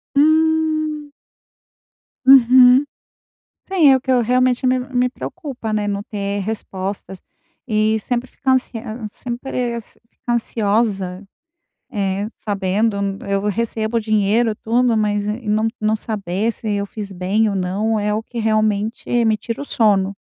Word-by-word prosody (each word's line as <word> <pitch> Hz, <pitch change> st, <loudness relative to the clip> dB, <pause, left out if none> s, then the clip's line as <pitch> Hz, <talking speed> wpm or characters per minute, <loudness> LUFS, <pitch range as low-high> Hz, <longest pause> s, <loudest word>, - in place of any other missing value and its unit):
Hum. 310 Hz, 0 st, +2 dB, 1.2 s
Uhum, 255 Hz, 0 st, +7 dB, 0.8 s
sim, 360 Hz, -7 st, +4 dB
é 265 Hz, -, +7 dB
o 260 Hz, -, -1 dB
que 260 Hz, -, -1 dB
eu 250 Hz, -1 st, +4 dB
realmente 250 Hz, +2 st, +2 dB
me 255 Hz, 0 st, +3 dB
me 250 Hz, -1 st, 0 dB
preocupa, 265 Hz, -6 st, -6 dB
né? 210 Hz, -1 st, -1 dB
Não 200 Hz, 0 st, -2 dB
ter 200 Hz, -1 st, -3 dB
respostas 195 Hz, -2 st, -5 dB, 0.4 s
e 220 Hz, -2 st, +1 dB
sempre 245 Hz, +3 st, -2 dB
ficar 265 Hz, -, -1 dB
ansie 260 Hz, -1 st, +1 dB, 0.4 s
sempre 240 Hz, 0 st, -4 dB, 0.3 s
ficar 240 Hz, -, -4 dB
ansiosa, 205 Hz, -4 st, 0 dB, 0.7 s
eh 200 Hz, -2 st, -1 dB
sabendo 200 Hz, +1 st, -1 dB, 0.3 s
eu 195 Hz, 0 st, 0 dB
recebo 220 Hz, +2 st, -1 dB
o -, -, -2 dB
dinheiro 215 Hz, +1 st, +2 dB
e -, -, -7 dB
tudo, 235 Hz, +2 st, +1 dB
mas, 205 Hz, -1 st, 0 dB
eh, 215 Hz, +4 st, -3 dB
não 215 Hz, +1 st, +1 dB
não 215 Hz, 0 st, +1 dB
saber 210 Hz, -1 st, -2 dB
se 220 Hz, -1 st, -5 dB
eu 200 Hz, 0 st, -1 dB
fiz 200 Hz, -1 st, -7 dB
bem 195 Hz, +4 st, +1 dB
ou -, -, -3 dB
não 200 Hz, +4 st, -1 dB
é 210 Hz, 0 st, 0 dB
o 220 Hz, -, -2 dB
que 240 Hz, -, -8 dB
realmente 215 Hz, +2 st, 0 dB
me 220 Hz, -1 st, +3 dB
tira 230 Hz, +4 st, -5 dB
o -, -, -4 dB
sono. 200 Hz, -6 st, +2 dB
220 Hz, 145 wpm, -19 LUFS, 205-250 Hz, 1.2 s, Uhum